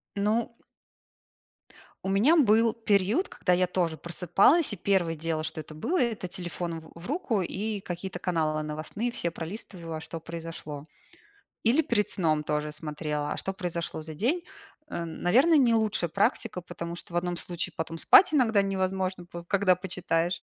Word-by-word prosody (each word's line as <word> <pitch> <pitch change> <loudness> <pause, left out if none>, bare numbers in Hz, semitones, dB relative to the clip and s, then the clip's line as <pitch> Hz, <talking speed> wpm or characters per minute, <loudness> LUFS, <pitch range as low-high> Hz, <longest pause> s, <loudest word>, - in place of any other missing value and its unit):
Ну. 220 +4 0 1.5
У - - 0
меня 215 +12 +5
был 225 -6 +4
период, 220 - +1
когда 180 - 0
я 180 +1 +3
тоже 175 -3 0
просыпалась, 180 - +3
и - - -2
1 175 -3 +1
дело, 160 0 -2
что 160 - -3
это 155 - -11
было- 295 - 0
это 225 -6 -1
телефон 175 -2 -5
в 160 - -15
в 170 - -9
руку 280 - 0
и 205 +4 -3
какие-то 180 0 -5
каналы 155 -4 0
новостные 155 +10 -3
все 175 -7 -2
пролистывала, 165 -2 -6
что 165 0 -7
произошло. 165 -3 -7 0.8
Или 265 +8 +4
перед 210 -6 +1
сном 155 -4 +1
тоже 150 0 -1
смотрела, 150 -1 -3
а - - -6
что 195 - -3
произошло 170 -4 -4
за 155 0 -8
день. 285 - 0 0.5
Эм, 165 -1 -5
наверное, 265 - +5
не 240 -5 +5
лучшая 215 -6 +1
практика, 200 - 0
потому 170 0 -6
что 175 - -11
в - - -4
одном 175 0 -1
случае 175 0 -4
потом 165 0 -4
спать 345 - +7
иногда 225 -8 +4
невозможно 190 -1 -1
п 170 0 -9
когда 200 -2 +4
почитаешь. 175 -2 -1
180 Hz, 160 wpm, -28 LUFS, 165-215 Hz, 1.5 s, спать